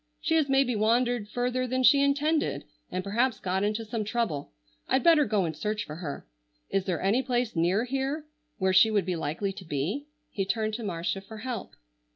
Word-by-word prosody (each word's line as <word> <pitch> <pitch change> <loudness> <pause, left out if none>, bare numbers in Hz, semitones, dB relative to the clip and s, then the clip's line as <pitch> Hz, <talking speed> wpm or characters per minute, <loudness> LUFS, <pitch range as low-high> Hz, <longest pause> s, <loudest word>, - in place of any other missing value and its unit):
She 325 - 0
has 315 -3 +3
maybe 270 -3 +3
wandered 230 0 +1
further 250 +2 -1
than 255 +1 0
she 280 +2 +7
intended, 295 +3 +1 0.3
and 185 0 -3
perhaps 225 +3 +1
got 190 +1 -1
into 215 +2 -1
some 220 0 -2
trouble. 210 -10 -2 0.4
I'd 265 - +2
better 325 -4 +6
go 210 -4 +1
and 160 -2 -3
search 210 +6 -2
for 150 - -8
her. 150 - -6 0.5
Is 195 -1 +1
there 180 -4 -2
any 210 +7 +3
place 245 -4 -1
near 175 +6 +2
here 270 +4 -2 0.3
where 190 -1 +1
she 190 +4 +7
would 205 -4 +1
be 180 -1 -1
likely 165 +5 -2
to 190 - -9
be?" 170 - -3 0.2
He 195 - -1
turned 215 +2 -1
to 230 +2 -4
Marcia 180 0 -2
for 220 +3 -11
help. 235 -2 -5
215 Hz, 200 wpm, -28 LUFS, 190-255 Hz, 0.5 s, she